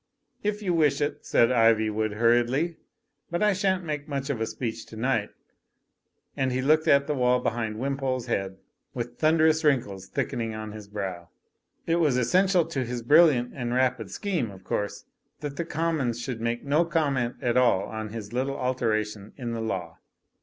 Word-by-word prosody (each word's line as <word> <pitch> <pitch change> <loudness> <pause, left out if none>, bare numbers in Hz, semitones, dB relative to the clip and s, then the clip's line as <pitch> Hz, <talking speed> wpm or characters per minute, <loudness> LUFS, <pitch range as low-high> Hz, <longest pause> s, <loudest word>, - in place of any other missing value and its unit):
'' - - -43
"If 210 0 -9
you 180 -3 +1
wish 155 -4 +3
it," 145 - -3
said 115 - +4
Iv)rwood 110 -3 +2
hurriedly, 120 +8 +2 0.5
"but 175 +4 -1
I 210 -1 +4
shan't 190 -1 0
make 150 -2 -4
much 140 -1 -2
of 120 -5 -3
a 110 - 0
speech 110 0 -4
to - - -11
night." 115 -2 0 1.1
And 130 -1 0
he 125 - -1
looked 155 +4 +3
at 140 0 +5
the 150 - -1
wall 125 -2 +3
behind 115 -3 -2
Wimpole's 130 -1 -2
head 95 -5 -2 0.4
with 120 0 -5
thun 155 +1 +4
derous 160 0 +3
wrinkles 105 -10 +1
thickening 115 +3 -2
on 110 0 -6
his 105 -1 -9
brow. 95 -5 -5 0.6
It 165 0 +2
was 150 -7 +2
es 125 -2 0
sential 185 -3 +4
to 135 -5 -1
his 120 -1 -4
brilliant 145 -3 +5
and 120 -2 -3
rapid 125 -5 +1
scheme, 170 - -2
of 95 -2 -12
course, 105 +2 -3 0.4
that 145 -2 -5
the 170 - -2
Commons 160 -8 -1
should 120 -2 -4
make 115 +1 -2
no 145 +4 +3
comment 140 -8 0
at 120 -1 0
all 120 -7 +4
on 110 -1 -5
his 110 0 -7
little 135 +2 -1
alteration 110 -5 -1
in 120 -4 -4
the 115 -1 -3
law. 90 -7 -4
125 Hz, 185 wpm, -26 LUFS, 110-150 Hz, 1.1 s, at